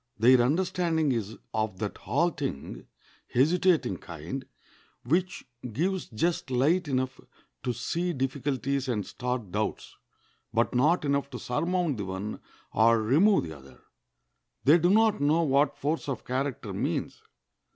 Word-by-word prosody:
Their 125 +3 +6
understanding 160 +2 +1
is 110 -3 -3 0.2
of 110 -3 -1
that 105 +1 -4
halting, 145 - -2 0.4
hesitating 155 - +2
kind, 85 - -7 0.6
which 180 +8 0 0.3
gives 185 - -1
just 150 +6 -1
light 145 +8 +2
enough 130 -1 -1 0.4
to - - -1
see 170 +9 -2
difficulties 135 -1 -1
and 105 -6 -1
start 125 -5 -4
doubts, 105 +2 -3 0.6
but - - +1
not 150 +6 +3
enough 140 0 0
to 125 - -6
surmount 170 +3 -1
the 100 - -3
one 95 +3 -5 0.3
or 115 +1 +5
remove 155 - +4
the 80 -2 -7
other. 65 -2 -15 0.8
They 155 +5 +6
do 175 +2 +3
not 220 -3 +4
know 155 +4 +3
what 140 0 +2
force 150 +1 -2
of 135 - -4
character 130 0 -2
means. - - -2
135 Hz, 130 wpm, -28 LUFS, 115-165 Hz, 0.8 s, Their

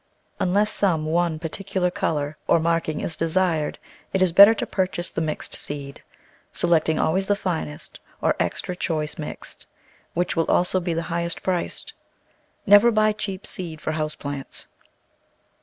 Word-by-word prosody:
Unless 205 +4 +2
some 165 -6 +1
one 165 0 +1
particular 180 +3 -2
colour 150 -3 -1
or - - +4
marking 165 -1 0
is 165 - -3
desired 165 -2 0 0.4
it 190 -1 +3
is 185 - +2
better 200 +5 +9
to - - -2
purchase 185 -2 -2
the - - -2
mixed 155 -1 -3
seed 140 -1 -6 0.3
— - - -34
selecting 160 -2 +2
always 190 +4 +1
the 205 - +3
finest, 165 - -4 0.2
or - - +2
"extra 180 - -2
choice 155 -4 -2
mixed," 150 - -8 0.5
which 175 +1 0
will 165 -1 0
also 180 +1 +3
be 175 -2 -2
the 165 - -1
highest 170 0 -2
priced. 180 -2 -2 0.7
Never 205 +4 +7
buy 215 -1 +3
cheap 200 -2 -5
seed 165 -4 -5
for 155 - -3
house 155 -1 -2
plants. 140 -1 -6
170 Hz, 155 wpm, -23 LUFS, 155-185 Hz, 0.7 s, better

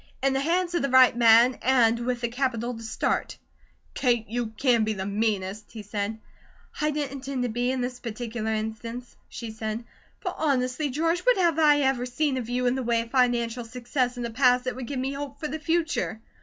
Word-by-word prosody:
"In 270 0 +3
the 270 - +1
hands 345 +4 0
of 345 - +1
the 275 - 0
right 255 -2 +6
man, 235 +1 +6
and 235 -3 +3
with 245 0 -2
the 240 - 0
capital 245 -1 -2
to 225 - -9
start." 220 -1 -2 0.6
"Kate, 240 -4 +1
you 235 +1 -2
can 230 +1 +2
be 215 0 0
the 190 -2 -4
meanest," 205 0 -2
he 220 -2 -7
said. 205 +1 -3 0.6
"I 300 - +2
didn't 295 -2 -2
intend 270 -1 -4
to 245 - -1
be, 245 +2 -1
in 260 -1 -2
this 250 0 -4
particular 230 -1 -4
instance," 220 +3 -5
she 230 -2 -7
said. 220 +1 -4 0.4
"But 365 -3 -3
honestly, 275 -1 0
George, 330 +6 0
what - - +3
have 340 -4 +2
I 295 -2 +5
ever 265 -2 +1
seen 265 +2 0
of 240 -2 -4
you 250 +1 0
in 245 - +3
the 265 - -2
way 235 -1 +1
of 230 0 -9
financial 245 -2 +1
success 245 +2 -2
in 245 - -3
the 235 - -3
past 250 +1 +3
that 255 0 -3
would 255 -2 -6
give 280 - -4
me 265 +2 -2
hope 280 0 -6
for 305 - -3
the 315 - -5
future?" 320 -7 -1
245 Hz, 215 wpm, -26 LUFS, 230-275 Hz, 0.6 s, right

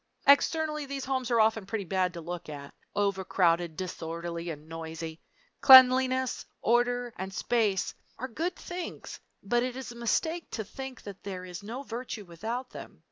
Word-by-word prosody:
Externally, 300 +1 +3
these 275 -1 -4
homes 260 -2 -1
are 235 -2 +3
often 220 -2 +3
pretty 205 0 -2
bad 185 0 +1
to 170 - -6
look 170 0 -6
at 140 -1 -8 0.2
overcrowded, 180 -4 +1
disorderly, 170 -1 -4
and 150 -1 -7
noisy. 165 0 -6 0.4
Cleanliness, 260 -1 +7 0.2
order, 245 0 +1
and 190 +1 -4
space 210 -1 +1 0.2
are 260 - -4
good 330 +9 -2
things, 355 -2 -7 0.2
but 240 +4 +2
it 250 0 -2
is 260 -2 -6
a - - -10
mistake 320 +9 -1
to 220 - -3
think 265 +4 -8
that 200 -2 -9
there 185 -2 -6
is 180 +1 -7
no 235 +7 -6
virtue 235 -4 -6
without 225 +9 -5
them. - - -10
220 Hz, 160 wpm, -29 LUFS, 180-255 Hz, 0.4 s, Cleanliness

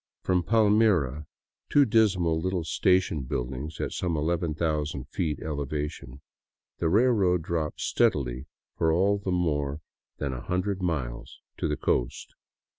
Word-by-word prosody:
From 90 -1 +2
Palmira, 100 - +2 0.2
— - - -60
two 145 -1 +6
dismal 95 -8 +2
little 90 -1 -1
station 90 -1 +2
buildings 65 +4 -4
at - - -2
some 85 -3 -2
ii, 75 - -1
ooo 80 -4 -1
feet 80 -4 -2
elevation 75 -2 -4 0.3
— - - -67
the 80 - +1
railroad 100 -5 +3
drops 80 -2 -2
steadily 65 -1 +1 0.3
for 80 - +2
all 100 +5 +2
the 100 - -4
more 75 -5 0 0.4
than 70 -3 -3
a 60 - -5
hundred 90 +3 -2
miles 60 -9 -3 0.2
to - - -1
the - - -1
coast. - - -1
80 Hz, 140 wpm, -27 LUFS, 75-95 Hz, 0.4 s, two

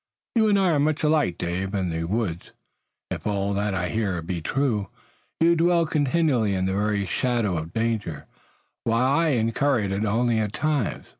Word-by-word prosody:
"You 220 -2 +3
and 200 - +4
I 190 -2 +3
are 150 - +2
much 150 +1 +1
alike, 150 - +2
Dave. 95 +3 -3
In 95 -3 -1
the 80 0 -2
woods, 95 -3 -3 0.6
if - - -4
all 100 -1 0
that 100 0 -1
I 90 -1 -1
hear 105 -5 -1
be 85 0 -4
true, 115 - 0 0.5
you 170 +1 +4
dwell 170 0 +3
continually 145 -8 +1
in 95 0 0
the 95 - 0
very 100 0 0
shadow 115 -2 0
of 80 0 -4
danger, 110 -8 -2 0.6
while 115 +2 +2
I 165 - +2
incur 125 0 +1
it 100 -1 -2
only 115 +2 +1
at 105 -1 -2
times. 150 - -1
110 Hz, 175 wpm, -24 LUFS, 95-145 Hz, 0.6 s, and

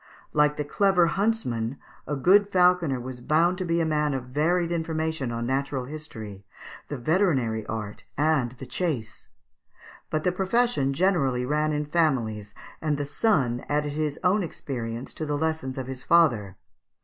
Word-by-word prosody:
Like 150 0 +3
the 150 - -1
clever 190 +2 +3
huntsman, 165 - -1 0.3
a 145 - -1
good 195 +9 +4
falconer 180 -6 +4
(Fig. 125 - -5
156) - - -11
was 130 -1 -6
bound 170 +4 +3
to 185 - -2
be 170 0 +1
a 165 - +2
man 150 -2 +1
of 125 -1 -5
varied 170 +5 +1
information 160 -5 -2
on 115 0 -3
natural 135 0 -1
history, 110 -9 -8 0.4
the 145 - -4
veterinary 130 - +1
art, 110 -2 -5
and 145 -5 +2
the 130 +1 -9
chase; 125 -5 -3 0.8
but 155 0 -1
the 180 - +2
profession 190 - +1
generally 135 -7 +1
ran 150 +3 +1
in 150 0 -1
families, 120 -10 0 0.3
and 150 -2 0
the 145 - -2
son 140 - +1
added 145 0 0
his 150 -1 -2
own 190 +3 +3
experience 120 -8 -5
to 155 - -4
the 145 0 0
lessons 160 -4 -2
of 130 - -3
his 130 -1 -6
father. 115 - +3
150 Hz, 165 wpm, -26 LUFS, 125-170 Hz, 0.8 s, good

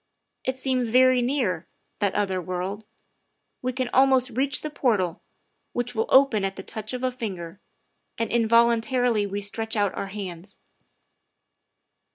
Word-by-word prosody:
It 260 0 -2
seems 260 -2 0
very 255 +1 +5
near 240 - -1 0.3
that 200 -2 0
other 190 -3 0
world; 185 +4 -4 0.8
we 255 - -1
can 255 0 -2
almost 260 -1 +4
reach 265 +4 +1
the 305 - -5
portal, 205 - 0 0.5
which 245 0 -2
will 225 -1 -1
open 265 -6 +5
at 195 0 -2
the 190 - -8
touch 215 +3 -6
of 250 0 -4
a 255 - +1
finger, 195 -8 -6 0.6
and 230 - -2
involuntarily 235 0 +3
we 200 +1 -4
stretch 220 +3 -3
out 205 -2 +1
our 195 - -4
hands. 195 -2 -7
225 Hz, 145 wpm, -25 LUFS, 200-255 Hz, 0.8 s, very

